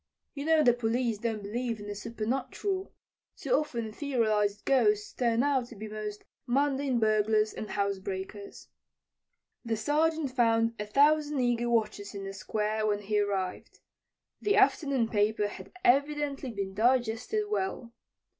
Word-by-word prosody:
You 280 0 -5
know 320 -1 +4
the 245 - +6
police 235 -1 -1
don't 220 -2 -2
believe 230 +2 -3
in 205 - -8
the 205 - -4
supernatural. 250 - -3 0.5
Too - - -6
often 235 - 0
etherealized 215 -6 0
ghosts 215 -6 +2
turn 235 -1 +1
out 270 -4 +1
to 240 - -12
be 215 +1 -7
most 210 -1 -6 0.2
mundane 275 0 +1
burglars 215 0 +2
and 215 - -6
housebreakers. 200 0 -4 1.0
The 230 -2 -1
Sergeant 305 +4 +1
found 230 -2 +2
a 210 - -3
thousand 295 +4 +3
eager 240 -1 +1
watchers 215 -3 -1
in 200 - -5
the 195 0 -6
Square 215 +2 -1
when 205 -1 0
he 210 +1 +1
arrived. 195 -3 -3 0.6
The 415 0 +2
afternoon 280 - +3
paper 210 -1 +1
had 190 -2 -10
evidently 280 0 +2
been 200 -4 -4
digested 240 - +1
well. 380 - -3
230 Hz, 140 wpm, -29 LUFS, 210-270 Hz, 1.0 s, the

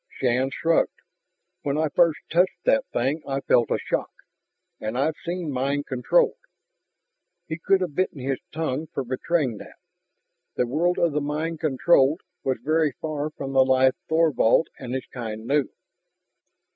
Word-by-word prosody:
Shann 130 +1 0
shrugged. 165 +4 +1 0.6
"When 140 0 -1
I 155 0 +1
first 165 +1 +3
touched 180 +3 +2
that 275 -1 +3
thing 135 +6 0
I 135 0 -1
felt 120 -3 +3
a - - +1
shock. - - -2 0.7
And 110 +3 -3
I've 150 +4 +1
seen 175 -2 -3
mind 140 +2 -1
controlled 460 - +2 0.6
" - - -56
He 160 +1 -4
could 190 +3 +2
have 180 -5 -2
bitten 185 -1 -1
his 135 0 -2
tongue 155 -1 -2
for 135 - -4
betraying 130 0 -1
that. - - -12 0.8
The 125 - +1
world 170 +8 +1
of 170 - +2
the 150 +1 -1
mind 155 +3 -2
controlled 150 +1 +3 0.2
was 130 -1 0
very 155 0 +2
far 155 +1 -3
from 135 -3 -6
the 135 -1 +6
life 130 0 +4 0.2
Thorvald 160 -4 +3
and 130 -1 -5
his 130 - -3
kind 110 -3 -6
knew. 140 +2 +1
145 Hz, 160 wpm, -25 LUFS, 130-165 Hz, 0.8 s, the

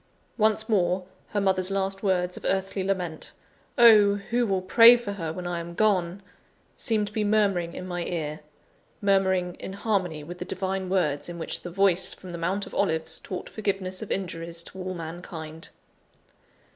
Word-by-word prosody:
Once 220 -1 +2
more, 185 -3 +1 0.2
her 210 - -2
mother's 190 -1 +1
last 195 0 0
words 180 -3 0
of - - -10
earthly 190 0 -1
lament 180 -5 -3 0.4
"Oh, 215 -4 +7
who 235 +4 -1
will 190 -2 0
pray 230 +5 +8
for 235 -4 -5
her 165 -5 -4
when 180 +2 -6
I 175 -1 -2
am 170 0 -7
gone!" 195 -3 +1 0.5
seemed 215 -2 0
to 205 - -8
be 215 - 0
murmuring 200 -5 +1
in 185 - -6
my 175 -1 -3
ear 155 -3 -3 0.6
murmuring 190 -3 +2
in 190 - -6
harmony 190 -7 -1
with 175 +4 -9
the - - -3
divine 190 0 -3
words 165 -6 0
in 175 - -6
which 165 - -4
the 175 - -7
Voice 190 0 +2
from 185 - -11
the 170 - -6
Mount 190 +4 -1
of - - -12
Olives 160 -4 0
taught 185 - -6
forgiveness 195 -3 -3
of 220 - -6
injuries 170 -3 -2
to 190 - -10
all 185 0 -4
mankind. 160 -1 -7
185 Hz, 175 wpm, -26 LUFS, 175-200 Hz, 0.6 s, pray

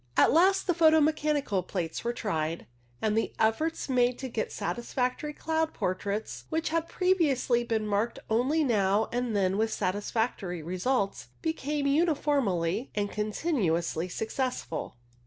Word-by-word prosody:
At - - +6
last 380 +4 +4
the 355 - +2
photo 320 -1 +5
mechanical 295 -8 +1
plates 175 -2 -4
were 235 - 0
tried, 165 -8 -2 0.4
and 215 -1 +2
the 225 - 0
efforts 265 +10 +1
made 250 -2 +2
to 260 - -5
get 225 -2 -2
satisfactory 250 +4 -2
cloud 320 +1 -1
portraits, 200 +3 -3
which 320 0 -1
had 330 +1 -1
previously 295 -10 +2
been 225 -2 -1
marked 210 +3 0
only 260 +8 +2
now 210 -4 +2
and 245 -2 -1
then 195 0 +1
with 220 0 +1
satisfactory 195 -3 -2
results, 195 - -1 0.2
became 300 -2 -1
uniformly 275 - +1
and 205 -1 -1
continuously 200 - -1
successful. 220 - -3
235 Hz, 135 wpm, -29 LUFS, 200-300 Hz, 0.4 s, At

